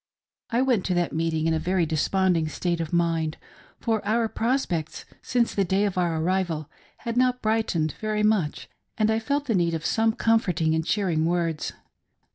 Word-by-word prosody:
I 240 Hz, +2 st, +2 dB
went 245 Hz, -8 st, +2 dB
to 185 Hz, -, 0 dB
that 175 Hz, -1 st, 0 dB
meeting 160 Hz, -1 st, 0 dB
in 165 Hz, -, +2 dB
a 160 Hz, -, +1 dB
very 180 Hz, +1 st, +1 dB
desponding 165 Hz, +1 st, +1 dB
state 170 Hz, +2 st, -2 dB
of 160 Hz, -, -4 dB
mind, 165 Hz, -2 st, 0 dB, 0.4 s
for 225 Hz, -2 st, 0 dB
our 225 Hz, +2 st, +1 dB
prospects 220 Hz, -, -2 dB, 0.2 s
since 240 Hz, -2 st, 0 dB
the 200 Hz, -, +2 dB
day 190 Hz, +3 st, +1 dB
of 200 Hz, -, -2 dB
our 170 Hz, -3 st, 0 dB
arrival 170 Hz, -3 st, -1 dB, 0.3 s
had 230 Hz, 0 st, -4 dB
not 250 Hz, 0 st, +2 dB
brightened 215 Hz, -8 st, +1 dB
very 215 Hz, -1 st, 0 dB
much, 210 Hz, -8 st, +1 dB, 0.3 s
and 215 Hz, -1 st, +2 dB
I 220 Hz, -, +1 dB
felt 280 Hz, +6 st, -1 dB
the 240 Hz, -, 0 dB
need 170 Hz, -3 st, +1 dB
of 160 Hz, -, -5 dB
some 225 Hz, 0 st, +2 dB
comfort 225 Hz, -8 st, +1 dB
ing 160 Hz, -1 st, +2 dB
and 160 Hz, 0 st, +1 dB
cheering 170 Hz, -4 st, 0 dB
words. 170 Hz, -3 st, -1 dB
185 Hz, 185 wpm, -25 LUFS, 165-220 Hz, 0.4 s, I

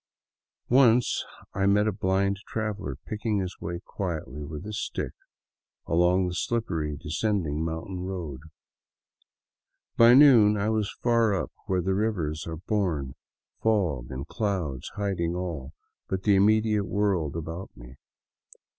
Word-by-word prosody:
Once 125 Hz, -2 st, +4 dB, 0.3 s
I 100 Hz, 0 st, +1 dB
met 105 Hz, +1 st, +4 dB
a -, -, +2 dB
blind 100 Hz, 0 st, 0 dB
traveler 105 Hz, -, -3 dB
picking 105 Hz, 0 st, -2 dB
his 95 Hz, -1 st, -3 dB
way 85 Hz, +1 st, -4 dB
quite 85 Hz, -5 st, -3 dB
swiftly 75 Hz, +3 st, -8 dB
with 75 Hz, +5 st, -7 dB
his 105 Hz, 0 st, -4 dB
stick -, -, -3 dB, 0.7 s
along 90 Hz, +2 st, +3 dB
the 90 Hz, -, -3 dB
slippery, 85 Hz, -8 st, -2 dB
descending 80 Hz, -1 st, -1 dB
mountain 80 Hz, +3 st, -4 dB
road. 90 Hz, -7 st, -5 dB, 1.6 s
By 115 Hz, +1 st, +8 dB
noon 120 Hz, -7 st, +7 dB
I 100 Hz, +2 st, 0 dB
was 110 Hz, -2 st, 0 dB
far 115 Hz, -3 st, +3 dB
up 95 Hz, -, -3 dB, 0.2 s
where 90 Hz, -2 st, +1 dB
the 95 Hz, +2 st, +1 dB
rivers 90 Hz, -8 st, -1 dB
are 80 Hz, -1 st, -4 dB
born, 85 Hz, -, -1 dB, 0.5 s
fog 90 Hz, -, +1 dB
and 65 Hz, +1 st, -5 dB
clouds 90 Hz, -, -2 dB
hiding 95 Hz, -5 st, -1 dB
all 80 Hz, -6 st, -4 dB, 0.3 s
but 95 Hz, 0 st, -3 dB
the 105 Hz, -, +4 dB
immediate 105 Hz, +1 st, +3 dB
world 95 Hz, -7 st, 0 dB
about 85 Hz, +3 st, -5 dB
me. -, -, -13 dB
95 Hz, 135 wpm, -27 LUFS, 80-105 Hz, 1.6 s, By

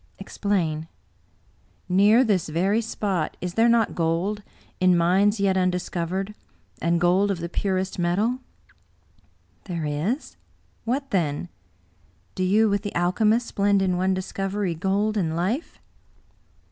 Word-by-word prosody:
" -, -, -37 dB
Explain." 165 Hz, -8 st, -1 dB, 0.5 s
" -, -, -37 dB, 0.2 s
Near 205 Hz, +7 st, +5 dB
this 200 Hz, -9 st, 0 dB
very 190 Hz, +8 st, +1 dB
spot 200 Hz, -7 st, -2 dB
is 180 Hz, 0 st, -4 dB
there 225 Hz, +3 st, +4 dB
not 230 Hz, -2 st, +3 dB
gold 175 Hz, +5 st, -1 dB, 0.2 s
— -, -, -31 dB
in 185 Hz, -1 st, +5 dB
mines 195 Hz, +5 st, +3 dB
yet 195 Hz, -1 st, +2 dB
un 185 Hz, 0 st, +3 dB
discovered 180 Hz, +2 st, -3 dB, 0.2 s
— -, -, -34 dB
and 170 Hz, 0 st, +1 dB
gold 180 Hz, +4 st, +3 dB
of 195 Hz, -, 0 dB
the 170 Hz, -, -4 dB
purest 190 Hz, +1 st, -2 dB
metal? 205 Hz, +9 st, +1 dB, 0.6 s
" -, -, -37 dB
"There 170 Hz, -4 st, -3 dB
is. 160 Hz, -, -2 dB, 0.5 s
What 270 Hz, +4 st, -2 dB
then? 170 Hz, -3 st, -1 dB, 0.8 s
Do 185 Hz, -, -2 dB
you, 210 Hz, +4 st, +4 dB
with 200 Hz, -1 st, 0 dB
the 205 Hz, -1 st, -6 dB
alchemists, 215 Hz, +7 st, +1 dB
blend 200 Hz, -1 st, +2 dB
in 185 Hz, -1 st, +1 dB
one 185 Hz, +1 st, +1 dB
discovery, 195 Hz, 0 st, -2 dB
gold 200 Hz, +6 st, 0 dB
and 165 Hz, -5 st, 0 dB
life?" 205 Hz, -, -2 dB
190 Hz, 145 wpm, -24 LUFS, 175-210 Hz, 0.8 s, Near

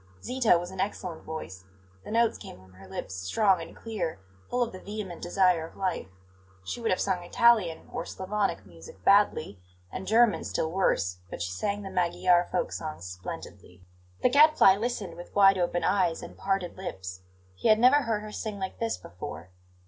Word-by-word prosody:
Zita 250 Hz, -8 st, +3 dB
was 175 Hz, +1 st, -5 dB
in 190 Hz, -, -9 dB
excellent 185 Hz, -4 st, -3 dB
voice; 95 Hz, -13 st, -7 dB, 0.4 s
the -, -, -10 dB
notes 230 Hz, 0 st, +2 dB
came -, -, -10 dB
from 95 Hz, 0 st, -19 dB
her 95 Hz, +1 st, -14 dB
lips 95 Hz, 0 st, -6 dB
strong 170 Hz, -, +2 dB
and 165 Hz, -, -9 dB
clear, 195 Hz, -, -4 dB, 0.3 s
full 245 Hz, 0 st, +1 dB
of 235 Hz, -, -4 dB
the 185 Hz, -, -9 dB
vehement 205 Hz, -4 st, -6 dB
desire 180 Hz, -2 st, +2 dB
of -, -, -18 dB
life. 185 Hz, -, -2 dB, 0.6 s
She 235 Hz, -, -5 dB
would 230 Hz, -, 0 dB
have 185 Hz, -, +1 dB
sung 185 Hz, -2 st, 0 dB
Italian 190 Hz, -3 st, +3 dB
or -, -, -2 dB
Slavonic 190 Hz, -, -2 dB
music 85 Hz, +1 st, -14 dB
badly, 195 Hz, -, +3 dB, 0.3 s
and 190 Hz, -, -6 dB
German 230 Hz, 0 st, +4 dB
still 160 Hz, -, -2 dB
worse; 90 Hz, -, +1 dB
but -, -, -7 dB
she 90 Hz, -, -3 dB
sang 200 Hz, -, -2 dB
the 195 Hz, -, -7 dB
Magyar 175 Hz, 0 st, +2 dB
folk 180 Hz, -, -1 dB
songs 155 Hz, -, -6 dB
splendidly. 90 Hz, 0 st, -9 dB, 0.4 s
The -, -, +6 dB
Gadfly 290 Hz, -7 st, +6 dB
listened 205 Hz, -6 st, -3 dB
with 175 Hz, -, -11 dB
wide 195 Hz, -1 st, +6 dB
open 175 Hz, 0 st, 0 dB
eyes 185 Hz, -3 st, +1 dB
and -, -, -9 dB
parted 195 Hz, -3 st, -2 dB
lips; 95 Hz, -, -6 dB, 0.3 s
he 90 Hz, -, -2 dB
had 215 Hz, -, +6 dB
never 255 Hz, +6 st, +6 dB
heard 225 Hz, -4 st, -1 dB
her 215 Hz, -, -8 dB
sing 210 Hz, -1 st, -5 dB
like 190 Hz, -1 st, -5 dB
this 230 Hz, -1 st, -1 dB
before. 90 Hz, 0 st, -9 dB
185 Hz, 185 wpm, -28 LUFS, 160-210 Hz, 0.6 s, The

